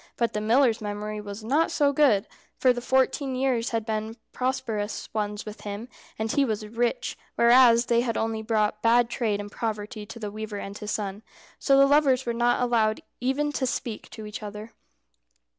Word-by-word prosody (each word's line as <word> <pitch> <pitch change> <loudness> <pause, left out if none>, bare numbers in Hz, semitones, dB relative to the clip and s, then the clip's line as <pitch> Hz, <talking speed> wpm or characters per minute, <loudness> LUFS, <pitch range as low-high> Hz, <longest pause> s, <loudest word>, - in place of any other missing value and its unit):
But 235 -1 0
the 210 - -2
miller's 230 +1 +3
memory 210 0 -4
was 205 +1 -8
not 285 +9 +2
so 285 -2 +2
good, 260 -9 +4 0.3
for 255 -1 +4
the 245 - -5
fourteen 265 +1 +1
years 255 -3 0
had 225 -2 -2
been 220 +1 -3 0.2
prosperous 225 -5 -2
ones 210 -1 -2
with 215 0 -9
him, 210 +4 -6 0.3
and 220 0 -2
he 280 - +3
was 215 -4 -2
rich, 240 - -1 0.2
whereas 235 0 +6
they 235 0 +3
had 235 -2 -1
only 225 0 -1
brought 215 -1 0
bad 235 +1 +4
trade 215 -5 0
and 205 0 -7
poverty 215 -1 -4
to 225 - -9
the 210 -3 -5
weaver 215 0 -6
and 200 0 -6
his 210 - -6
son. 205 -1 -3 0.4
So 275 -1 +4
the 275 - +7
lovers 275 -2 +3
were 235 - -1
not 240 +1 +2
allowed 225 -3 +1 0.2
even 270 +4 0
to 270 -2 -1
speak 235 -3 -4
to 220 - -9
each 210 +1 -7
other. 210 +1 -8
225 Hz, 190 wpm, -26 LUFS, 210-255 Hz, 0.4 s, the